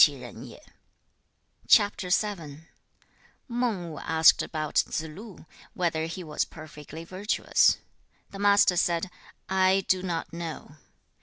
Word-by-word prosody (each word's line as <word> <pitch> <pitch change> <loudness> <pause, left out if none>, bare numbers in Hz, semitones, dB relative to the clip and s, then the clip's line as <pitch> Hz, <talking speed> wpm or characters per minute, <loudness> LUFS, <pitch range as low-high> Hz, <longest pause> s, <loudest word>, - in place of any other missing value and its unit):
Mang - - -10 3.0
Wu 215 - -2
asked 160 0 +4
about 155 -2 -4
Tsze 160 - 0
lu, 205 -2 -11 0.3
whether 160 -3 -1
he 180 +2 -6
was 155 -2 -1
perfectly 155 0 -10
virtuous. 190 +5 +2 0.5
The 195 - -9
Master 200 -2 +4
said, 175 +1 0 0.4
'I 190 0 +2
do 185 -1 +2
not 170 -3 -4
know.' 165 -3 -7
175 Hz, 95 wpm, -27 LUFS, 160-190 Hz, 3.0 s, asked